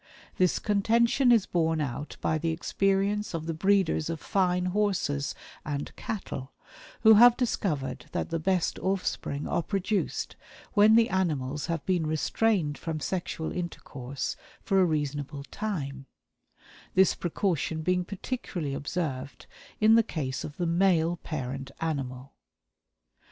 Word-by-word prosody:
This 185 -1 +3
contention 230 +5 +3
is 230 -5 +5
borne 160 -2 +1
out 145 0 -4
by 155 - +1
the 165 +1 -1
experience 195 +4 0
of 160 -1 -4
the 165 - -2
breeders 190 -2 +2
of 165 -1 -3
fine 180 +1 +1
horses 185 -9 0 0.3
and 145 -1 -4
cattle, 140 -11 -5 0.5
who 220 -1 +8
have 240 +3 +8
discovered 150 - -2
that - - -3
the 165 - 0
best 185 +1 0
offspring 180 -6 -2
are - - +1
produced 195 +4 -2 0.4
when 215 +1 +6
the 230 0 +5
animals 150 -7 -1
have 165 -4 -2
been 175 -4 +1
restrained 155 0 +1
from 160 -2 -3
sexual 170 -1 -3
intercourse 140 -6 -5 0.3
for 195 -1 +3
a - - +5
reasonable 145 -2 -2
time; 140 -11 -4 0.9
this 190 0 +5
precaution 170 -3 -1
being 180 +1 +1
particularly 185 - -4
observed 140 -2 -4 0.3
in 220 +1 +6
the 230 - +7
case 135 - -3
of 150 - -7
the 175 - -1
male 170 -1 +3
parent 135 -4 -5
animal. 135 -4 -3
170 Hz, 130 wpm, -28 LUFS, 145-195 Hz, 0.9 s, who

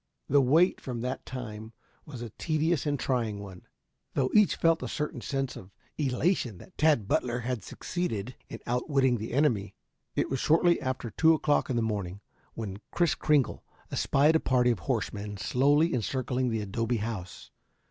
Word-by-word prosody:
The 140 +1 +5
wait 160 +8 +4
from 120 -3 -5
that 125 +2 -4
time 110 -3 -7 0.3
on - - -10
was 125 -4 -7
a 115 - -7
tedious 155 +2 0
and 145 -2 0
trying 115 -5 -1
one, 95 -3 -10 0.5
though 130 -2 +1
each 210 -3 +5
felt 165 -1 +2
a - - -3
certain 150 -1 -3
sense 135 -2 -2
of 95 - -10 0.3
elation 135 - 0
that 185 - -15
Tad 150 -10 +3
Butler 125 -4 0
had 120 -4 -3
succeeded 125 - -4
in - - -6
outwitting 125 0 +1
the 110 - -5
enemy. 120 -7 +1 0.4
It - - +1
was 135 - -2
shortly 170 +4 +3
after 130 -3 -3
two 160 +6 +5
o'clock 150 -2 +1
in 130 - 0
the 115 - +1
morning 100 -4 -3 0.4
when 105 -3 -5
Kris 170 -2 +2
Kringle 150 -4 +1 0.3
espied 150 +3 +3
a - - +5
party 125 -3 +3
of 115 - -2
horsemen 105 -1 -3
slowly 145 - +3
encircling 130 +1 -1
the 110 -2 -1
adobe 115 +4 -1
house. 105 -5 -6
125 Hz, 170 wpm, -29 LUFS, 110-150 Hz, 0.5 s, The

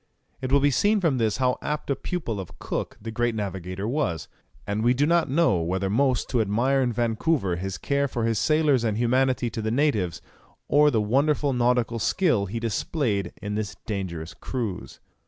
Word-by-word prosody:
It 130 0 -3
will 140 - +5
be 145 +1 +3
seen 205 - +3
from 160 -9 +1
this 110 -3 +1
how 125 -1 +1
apt 150 -1 -3
a - - +2
pupil 130 - -4
of 90 -4 -8
Cook - - -4
the 115 +2 -6
great 120 0 0
navigator 95 -1 -4
was; 105 - -1 0.4
and 105 +1 -2
we 120 +2 +4
do 145 +3 +2
not 170 -1 +2
know 135 - +3
whether 95 +3 -1
most 130 +2 +2
to 125 -3 +2
admire 120 +6 +1
in 125 -2 +1
Vancouver 115 - 0
his 95 +1 -4
care 140 0 0
for 120 -3 -3
his 115 -3 +1
sailors 155 -5 +3
and 110 -2 0
humanity 125 0 +1
to 110 - -4
the 110 - -1
natives, 110 - +1 0.5
or 150 +1 +5
the 115 -6 +1
wonderful 140 +5 +1
nautical 120 -1 +1
skill 125 - +1
he 115 +5 -4
displayed 110 - -1
in 105 0 -3
this 105 -1 -3
dangerous 90 -6 -4
cruise. 115 -8 -5
120 Hz, 190 wpm, -25 LUFS, 105-140 Hz, 0.5 s, will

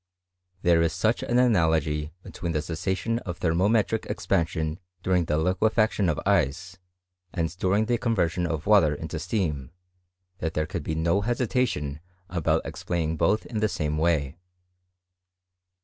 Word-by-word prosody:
There 85 -1 +4
is 85 -1 +1
such 110 +6 +1
an 120 - 0
analogy 80 - +2
between 85 -2 -5
the 75 -1 -1
cessation 95 +8 -2
of 90 -6 -6
thermometric 100 +6 +1
expansion 85 -4 -1 0.2
during 90 -2 +2
the 75 0 0
liquefaction 100 +3 +2
of 75 - 0
ice, 90 +7 0 0.5
and 85 0 -2
during 100 +4 +2
the 120 0 0
conyersion 90 -7 0
of 80 -2 -3
water 95 -8 +5
into 80 +2 -5
steam, 80 - -2 0.7
that 80 +1 -3
their 75 - +1
could - - -4
be 80 - -3
no 85 +5 +1
hesitation 115 - -1 0.3
about 85 -4 +1
explaining 80 -2 -2
both 105 +7 +1
in 110 -2 -4
the 110 0 +2
same 75 -3 -2
way. 80 -3 +1
85 Hz, 140 wpm, -26 LUFS, 80-105 Hz, 0.7 s, water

